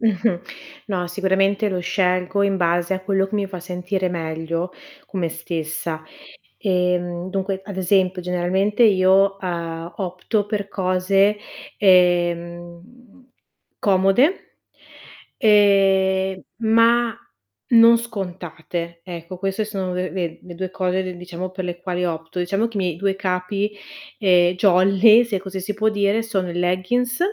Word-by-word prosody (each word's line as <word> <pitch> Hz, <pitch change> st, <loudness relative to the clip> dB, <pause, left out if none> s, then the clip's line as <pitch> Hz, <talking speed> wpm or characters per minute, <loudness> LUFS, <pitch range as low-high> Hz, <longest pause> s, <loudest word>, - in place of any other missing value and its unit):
Mh-mh. 210 Hz, -4 st, +1 dB, 0.5 s
No, 180 Hz, -3 st, -1 dB
sicuramente 195 Hz, +3 st, +1 dB
lo 185 Hz, -1 st, -2 dB
scelgo 185 Hz, +1 st, 0 dB
in 200 Hz, -1 st, +1 dB
base 175 Hz, +1 st, +1 dB
a 190 Hz, -, -2 dB
quello 195 Hz, 0 st, 0 dB
che 200 Hz, -, -7 dB
mi 205 Hz, -1 st, 0 dB
fa 185 Hz, -2 st, -7 dB
sentire 180 Hz, +1 st, -3 dB
meglio 165 Hz, +1 st, -3 dB, 0.3 s
con 190 Hz, -, -5 dB
me 170 Hz, -, 0 dB
stessa. 160 Hz, -1 st, -4 dB, 0.6 s
Ehm, 180 Hz, -2 st, -1 dB
dunque, 195 Hz, 0 st, -2 dB
ad 200 Hz, -1 st, -8 dB
esempio 185 Hz, 0 st, +1 dB
generalmente 180 Hz, +5 st, 0 dB
io, 195 Hz, -2 st, +4 dB
uhm, 170 Hz, -2 st, -4 dB
opto 190 Hz, +3 st, -2 dB
per 205 Hz, -1 st, -3 dB
cose, 195 Hz, +2 st, +1 dB, 0.4 s
ehm, 175 Hz, +5 st, 0 dB, 0.5 s
comode 195 Hz, -, +3 dB, 1.0 s
ehm, 195 Hz, -2 st, +3 dB, 0.2 s
ma 230 Hz, +1 st, +3 dB, 0.5 s
non 230 Hz, 0 st, +7 dB
scontate. 175 Hz, -6 st, -6 dB
Ecco, 175 Hz, 0 st, -8 dB
queste 195 Hz, +3 st, -2 dB
sono 195 Hz, -3 st, -4 dB
le 180 Hz, 0 st, -2 dB
ve 175 Hz, -3 st, -4 dB
le 175 Hz, -1 st, -10 dB
2 185 Hz, +1 st, -4 dB
cose 185 Hz, 0 st, -1 dB
re 185 Hz, -1 st, -6 dB
diciamo 180 Hz, +1 st, -6 dB
per 185 Hz, 0 st, -5 dB
le 175 Hz, -1 st, -5 dB
quali 180 Hz, -1 st, -2 dB
opto. 165 Hz, +1 st, -4 dB
Diciamo 195 Hz, +6 st, 0 dB
che 230 Hz, -, -9 dB
i -, -, 0 dB
miei 180 Hz, -4 st, -1 dB
due 195 Hz, +2 st, -1 dB
capi, 195 Hz, +2 st, -2 dB, 0.5 s
ehm, 180 Hz, -3 st, +4 dB
jolly, 195 Hz, +5 st, +5 dB
se 220 Hz, -5 st, -2 dB
così 190 Hz, 0 st, -6 dB
si 205 Hz, +3 st, -4 dB
può 215 Hz, +1 st, +1 dB
dire, 205 Hz, +1 st, +1 dB
sono 190 Hz, -5 st, -2 dB
i 170 Hz, -, -6 dB
leggins 185 Hz, +9 st, 0 dB
185 Hz, 140 wpm, -21 LUFS, 175-200 Hz, 1.0 s, non